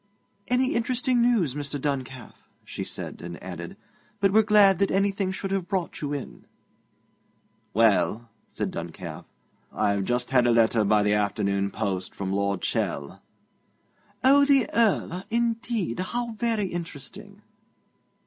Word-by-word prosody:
'Any 255 +1 +2
interesting 250 +1 +1
news, 225 - +2
Mr. 145 0 -3
Duncalf?' 130 -3 -5 0.2
she - - -5
said, - - -7
and 85 0 -7
added: 85 -2 -7 0.4
'But 195 -1 +2
we're 220 - +7
glad 205 -4 +5
that 200 - +2
anything 195 0 +1
should 190 +1 -4
have 195 -2 -1
brought 190 -4 -3
you 145 -1 -3
in.' 145 -3 -6 1.3
'Well,' 110 0 +3 0.2
said - - -3
Duncalf, 85 0 -7 0.5
'I've 100 -1 0
just 125 +2 -1
had 125 -2 +4
a - - +4
letter 115 -1 +3
by 105 0 +3
the 105 0 +2
afternoon 100 -1 0
post 100 -4 -3
from 95 -1 -3
Lord 100 -1 -1
Chell.' 70 0 -2 1.0
'Oh, 280 +2 +6
the 275 -5 +4
Earl! 195 -5 +1
Indeed; 230 - -1
how 235 +5 -2
very 225 -2 -1
interesting.' 185 +4 -7
145 Hz, 135 wpm, -26 LUFS, -, 1.3 s, we're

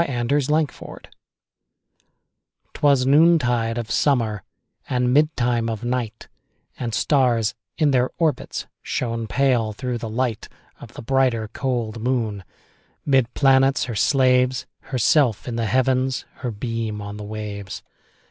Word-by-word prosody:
1827 145 +2 +1
Evening 145 - -9
Star - - -17 1.6
'Twas 140 -3 +3
noontide 130 -6 +3
of 120 -1 -4
summer, 115 -8 +1 0.5
And 125 0 +1
midtime 125 -6 +2
of 110 0 -4
night, 120 -3 -3 0.5
And 115 -3 -3
stars, 125 -6 +2 0.2
in 150 -3 +3
their 125 -1 +2
orbits, 160 -3 -1 0.2
Shone 115 -2 -3
pale, 120 -2 +1
through 125 +1 -4
the 115 - -5
light 115 -1 -2 0.3
Of - - -12
the - - -8
brighter, 120 -3 +1
cold 120 -4 -2
moon. 115 -5 -1 0.6
'Mid 130 -4 +2
planets 135 0 +4
her 120 -3 -4
slaves, 130 +1 +2
Herself 130 -2 +1
in 120 - -3
the 115 -1 -1
Heavens, 130 +1 +1
Her 125 - -4
beam 115 -1 -4
on 100 0 -7
the 105 - -7
waves. 105 -2 -6
125 Hz, 130 wpm, -22 LUFS, 115-135 Hz, 1.6 s, planets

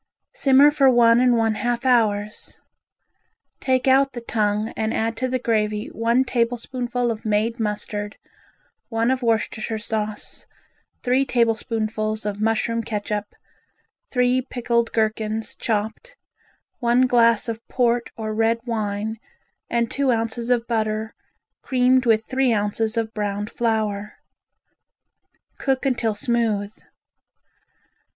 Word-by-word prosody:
Simmer 275 +2 +5
for 275 -2 +4
one 235 -1 +5
and 250 -1 +4
one 225 -1 +2
half 240 +3 -2
hours. 215 -4 0 1.0
Take 260 -1 0
out 270 +1 +4
the 240 - -6
tongue 215 -1 0
and 220 -1 -2
add 225 +1 -1
to 255 - -1
the 255 0 0
gravy 215 -3 -1
one 235 +3 +1
tablespoonful 245 0 -1
of 220 -1 -6
made 220 +2 0
mustard, 210 -1 -3 0.7
one 230 +1 +1
of 260 0 -1
Worcestershire 225 -1 -1
sauce, 215 -1 -5 0.6
three 255 +2 +3
tablespoonfuls 220 -3 -1
of 205 0 -3
mushroom 225 +1 +1
catsup, 210 -1 -4 0.8
three 250 0 +2
picketed 235 -2 -1
gherkins 220 0 -1
chopped, 220 - -3 0.6
one 240 0 +3
glass 230 -3 +4
of 225 -1 -3
port 240 -1 +1
or 215 -1 -3
red 225 +1 +2
wine, 215 -1 -2 0.5
and 235 -1 0
two 280 -1 0
ounces 230 0 -1
of 240 -2 +2
butter, 220 -1 -2 0.5
creamed 255 0 +2
with 220 -1 +3
three 260 -1 +1
ounces 215 +1 -1
of 225 -1 -1
browned 205 0 -3
flour. 215 -3 -1 1.5
Cook 270 0 0
until 235 -5 0
smooth. 215 -3 0
230 Hz, 120 wpm, -22 LUFS, 215-245 Hz, 1.5 s, Simmer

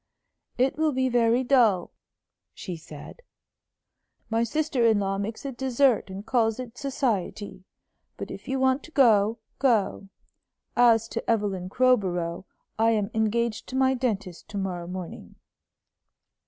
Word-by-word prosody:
"It 260 +4 +1
will 310 -2 +2
be 260 0 +1
very 240 +1 +2
dull," 235 -9 +3 0.6
she 180 - -6
said. 155 - -11 1.1
"My 225 +1 +2
sister 290 +1 0
in 225 -2 +4
law 195 0 -1
makes 220 +6 -5
a 275 - -3
desert 260 -2 +1
and 195 +2 -7
calls 225 -2 +1
it 245 -2 -7
society. 220 -8 -3 0.5
But - - -6
if - - -9
you 265 0 -1
want 260 +1 +2
to 330 - -15
go, 225 -6 +4 0.2
go. 215 -6 +1 0.7
As 230 -2 +4
to 230 - -5
Evelyn 200 -5 0
Crowborough, 190 -8 +1 0.3
I 225 0 +4
am 210 -1 -1
engaged 220 +1 0
to 260 - -7
my 265 0 +3
dentist 210 -8 -3
to 205 - -6
morrow 180 -3 -3
morning." 180 -1 -8
225 Hz, 140 wpm, -26 LUFS, 200-255 Hz, 1.1 s, in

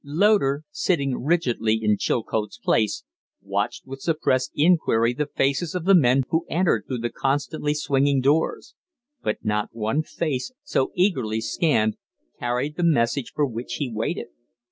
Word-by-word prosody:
Loder, 150 -2 +2
sitting 140 -8 0
rigidly 125 -8 +1
in 105 -1 +1
Chilcote's 110 0 -2
place, 110 -3 0 0.4
watched - - -3
with 135 0 -9
suppressed 130 -6 0
inquiry 145 -8 +3
the 150 +3 -2
faces 145 +4 0
of 175 -2 -3
the 195 - +5
men 135 -6 +5
who 165 +1 +2
entered 175 +1 +1
through 130 - -2
the 120 0 -3
constantly 145 +2 -1
swinging 140 -1 +2
doors; 145 +5 +1 0.5
but 105 - -3
not 105 0 0
one 115 +6 0
face, 155 - -3
so 135 - 0
eagerly 130 - +1
scanned, 110 -3 +1 0.4
carried 125 +5 -2
the 175 - -1
message 135 -5 +1
for 150 - +2
which 120 -2 -5
he 130 -6 -3
waited. 110 +1 -3
135 Hz, 145 wpm, -24 LUFS, 115-155 Hz, 0.5 s, the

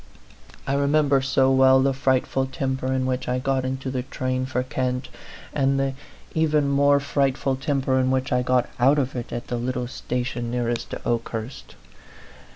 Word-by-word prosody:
I 135 - -1
re 140 0 +1
member 145 -2 +3
so 135 0 +2
well 130 0 +6
the 135 +1 +2
frightful 130 0 +1
temper 130 0 -2
in 130 -1 0
which 130 0 -2
I 125 - +1
got 135 0 0
into 130 0 -3
the 130 -1 -1
train 130 0 -3
for 125 -1 -1
Kent, 125 0 -2 0.4
and 135 -1 +1
the 135 0 0 0.4
even 155 -3 +2
more 140 0 +4
frightful 135 -1 0
temper 135 -1 0
in 130 0 +2
which 130 +1 0
I 125 -1 +2
got 125 -1 +1
out 135 +5 +5
of 135 -2 -1
it 120 -2 -5
at 120 0 -4
the 120 - -3
little 125 +1 -2
station 120 -1 -3
nearest 120 -1 -2
to - - -6
Okehurst. 115 +1 -4
130 Hz, 175 wpm, -24 LUFS, 125-135 Hz, 0.4 s, well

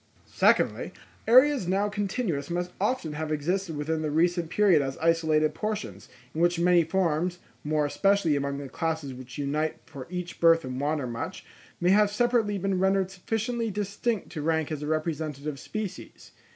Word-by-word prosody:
Secondly, - - +2 0.3
areas 255 -2 +5
now 195 +3 +1
continuous 200 - -2
must 175 +1 -2
often 205 -8 0
have 155 +1 -4
existed 165 +2 -1
within 155 +2 -1
the 155 - -1
recent 170 +2 +1
period 195 -7 +4
as 135 -1 -3
isolated 160 -2 +2
portions, 195 - -4 0.2
in 160 - -2
which 175 0 +3
many 175 0 +4
forms, 175 0 0 0.3
more 150 0 +1
especially 195 0 +2
among 140 0 -2
the 140 -1 -6
classes 160 0 -3
which 125 -1 -10
unite 150 +2 -1
for 135 -2 -9
each 180 -1 -6
birth 165 -2 +5
and 130 +1 -4
wander 145 -1 0
much, 120 -1 -5 0.3
may 175 +1 +3
have 210 +1 +5
separately 225 -2 +1
been 195 -1 -1
rendered 190 0 +2
sufficiently 225 +4 -2
distinct 205 +2 -2
to 155 - -5
rank 160 0 0
as 150 -1 -4
representative 155 -2 -3
species. 215 +1 -7
165 Hz, 160 wpm, -27 LUFS, 150-195 Hz, 0.3 s, areas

